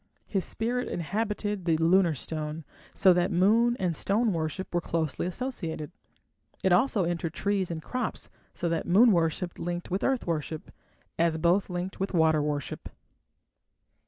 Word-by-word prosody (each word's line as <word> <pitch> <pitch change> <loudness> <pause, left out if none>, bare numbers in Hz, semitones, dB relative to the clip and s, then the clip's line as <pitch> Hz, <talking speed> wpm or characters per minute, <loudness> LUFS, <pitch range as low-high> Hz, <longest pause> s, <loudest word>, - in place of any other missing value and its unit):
His 195 -3 -1
spirit 245 +3 -2
inhabited 205 +2 -2
the 165 -2 +3
lunar 170 0 +4
stone, 155 +3 -4 0.3
so 185 - +6
that 175 +1 +1
moon 225 +7 +3
and 180 -3 0
stone 215 +6 +1
worship 165 +3 -3
were 175 - +1
closely 165 -1 -2
associated; 175 - -4 0.7
it 190 - +3
also 215 0 +3
entered 170 -1 -2
trees 200 -2 0
and 160 -2 -5
crops, 255 0 -3 0.3
so 175 - -2
that 165 -1 -1
moon 220 +7 +6
worship 170 0 0
linked 175 +1 -4
with 190 - -1
earth 265 -2 +1
worship, 160 -2 -3 0.5
as 165 -1 +2
both 175 +5 +2
linked 180 +1 -4
with 195 0 -2
water 160 -2 +4
worship. 145 -2 -3
175 Hz, 150 wpm, -28 LUFS, 165-200 Hz, 0.7 s, so